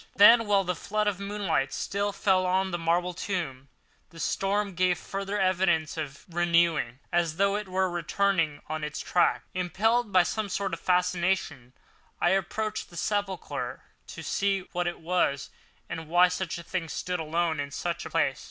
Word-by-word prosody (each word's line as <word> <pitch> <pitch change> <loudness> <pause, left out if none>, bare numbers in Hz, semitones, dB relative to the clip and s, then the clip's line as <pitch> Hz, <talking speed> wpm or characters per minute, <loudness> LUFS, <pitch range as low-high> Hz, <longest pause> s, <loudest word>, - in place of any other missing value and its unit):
Then 230 +2 +8
while 200 -1 +4
the 180 0 -1
flood 210 +5 -2
of 205 -3 0
moonlight 200 -9 -1
still 200 +6 -1
fell 190 -2 +2
on 190 +1 +1
the 175 - -2
marble 175 +2 +1
tomb, 160 -8 -4 0.4
the 165 0 -13
storm 195 +4 0
gave 180 0 +2
further 195 +2 -4
evidence 180 -4 +2
of 145 -4 -6
renewing, 170 -7 +2 0.2
as 170 -2 +1
though 200 +1 +3
it 210 -1 -3
was 190 0 +1
returning 175 -3 0
on 155 0 -4
its 150 0 -4
track. 175 - +2
Impelled 210 +6 +1
by 185 -2 +6
some 210 +4 -2
sort 195 -1 -2
of 165 - -3
fascination, 180 -8 0 0.5
I 175 - +3
approached 215 +3 -1
the 170 - -12
sepulchre 200 0 -3 0.2
to - - -8
see 195 -1 0
what 175 -1 -1
it 175 - -3
was, 160 -5 0 0.4
and 165 -1 -6
why 175 +2 +5
such 180 -1 -3
a 170 - -8
thing 170 -2 -3
stood 180 +5 -3
alone 160 0 0
in 140 0 -3
such 170 +4 -3
a - - -7
place. 145 -5 +1
180 Hz, 170 wpm, -28 LUFS, 165-195 Hz, 0.5 s, Then